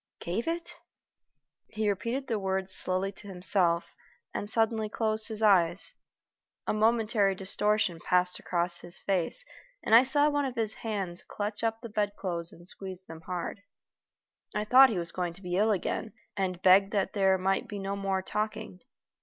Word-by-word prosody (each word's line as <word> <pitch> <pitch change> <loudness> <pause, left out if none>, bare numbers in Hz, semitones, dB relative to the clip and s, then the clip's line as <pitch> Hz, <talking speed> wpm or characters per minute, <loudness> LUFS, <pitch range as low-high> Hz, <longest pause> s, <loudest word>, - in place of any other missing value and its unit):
gave 190 - -3
it?" 335 +1 -4 0.9
He 215 0 -2
repeated 230 +7 -2
the 225 -5 -2
words 190 -1 0
slowly 185 +1 0
to 205 +1 -11
himself, 180 -2 +3 0.4
and 205 - -4
suddenly 220 -1 0
closed 220 0 +4
his 220 -1 -4
eyes. 180 -3 +3 0.7
A - - 0
momentary 215 -2 +2
distortion 200 -1 0
passed 180 0 +1
across 175 0 -1
his 175 0 -5
face, 195 - -2 0.4
and - - -1
I 230 - +10
saw 290 +3 +3
one 290 -1 0
of 260 -2 -4
his 220 -2 0
hands 195 -6 -4
clutch 205 +1 -5
up 225 0 -1
the 235 - -7
bedclothes 200 -5 -2
and 170 - -15
squeeze 190 0 -8
them 165 -3 -11
hard. 180 +3 -5 0.9
I 210 0 -1
thought 260 +4 +7
he 215 - -2
was 170 -1 -2
going 175 -2 -3
to 190 - -12
be 180 0 -3
ill 210 +4 +3
again, 215 +2 -2 0.2
and 185 -2 -3
begged 195 +2 +6
that 200 -2 0
there 190 -2 +3
might 190 +1 -1
be 205 - -6
no 195 0 -3
more 195 -1 -2
talking. 210 -3 -4
200 Hz, 170 wpm, -29 LUFS, 185-220 Hz, 0.9 s, I